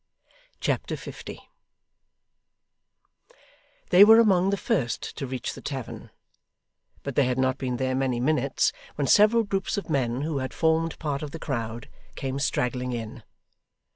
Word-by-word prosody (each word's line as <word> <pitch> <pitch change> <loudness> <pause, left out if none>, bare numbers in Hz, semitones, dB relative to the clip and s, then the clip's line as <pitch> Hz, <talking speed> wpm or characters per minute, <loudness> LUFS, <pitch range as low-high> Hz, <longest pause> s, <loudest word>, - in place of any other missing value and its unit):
Chapter - - -1
50 - - -9 2.5
They 185 - +9
were 220 +2 +8
among 195 -4 +4
the 200 - 0
first 175 - -2
to 135 - -4
reach 130 0 -4
the - - -10
tavern, 135 -4 -6 0.9
but 140 - -4
they 140 +1 +3
had 125 0 -1
not 130 +1 +1
been 125 -2 -2
there 130 0 -1
many 130 -2 0
minutes, 135 0 +1 0.2
when 145 - -1
several 215 - +5
groups 195 -2 -2
of 195 -5 -4
men 130 -3 0
who 150 -1 -2
had 130 0 -5
formed 160 0 +1
part 145 -3 -3
of 150 - -5
the 165 - -7
crowd, 115 -6 -4 0.3
came 135 0 -3
straggling 125 -1 -1
in. 115 +1 -6
135 Hz, 145 wpm, -26 LUFS, 125-165 Hz, 2.5 s, They